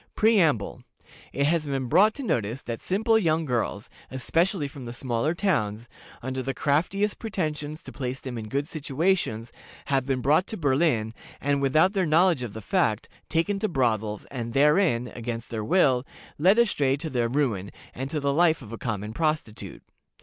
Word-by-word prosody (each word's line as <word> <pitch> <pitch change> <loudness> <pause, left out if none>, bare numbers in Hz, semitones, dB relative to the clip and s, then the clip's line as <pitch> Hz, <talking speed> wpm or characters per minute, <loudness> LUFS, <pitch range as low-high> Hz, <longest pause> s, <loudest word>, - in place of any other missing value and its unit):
"Preamble. 170 - +2 0.5
It 140 +2 0
has 155 0 +1
been 135 -2 -1
brought 205 - +4
to 280 - -6
notice 120 - -1
that 115 -1 -5
simple 220 +4 +2
young 165 -4 +1
girls, 120 -5 -2 0.2
especially 165 +5 0
from 140 -2 -10
the 120 - -6
smaller 130 +5 -1
towns, 120 - -1 0.4
under 130 +1 -3
the 135 +1 -3
craftiest 185 +8 0
pretensions 155 -8 -3
to - - -9
place 130 -1 -4
them 130 -2 -6
in 110 -2 -5
good 140 +3 -1
situations, 150 - -1 0.3
have 135 -2 0
been 135 -2 0
brought 155 +8 +3
to 220 - -5
Berlin, 135 -7 +1 0.3
and, 140 0 0
without 155 +8 +3
their 190 -4 +1
knowledge 165 -1 +4
of 120 -5 -5
the 110 - -7
fact, 110 - 0 0.2
taken 180 +5 0
to 215 - 0
brothels, 110 - 0
and 115 -3 -5
therein, 145 -4 +3
against 115 -1 -5
their 110 -2 -3
will, 135 - +3 0.4
led 190 +7 +5
astray 145 - +2
to 160 +3 -5
their 120 -2 0
ruin, 115 -8 0 0.2
and 135 +2 -5
to 150 - -2
the 140 -1 0
life 160 -2 +3
of 110 - -11
a 115 - -6
common 105 -2 -3
prostitute. 155 -6 -3
140 Hz, 175 wpm, -26 LUFS, 120-170 Hz, 0.5 s, led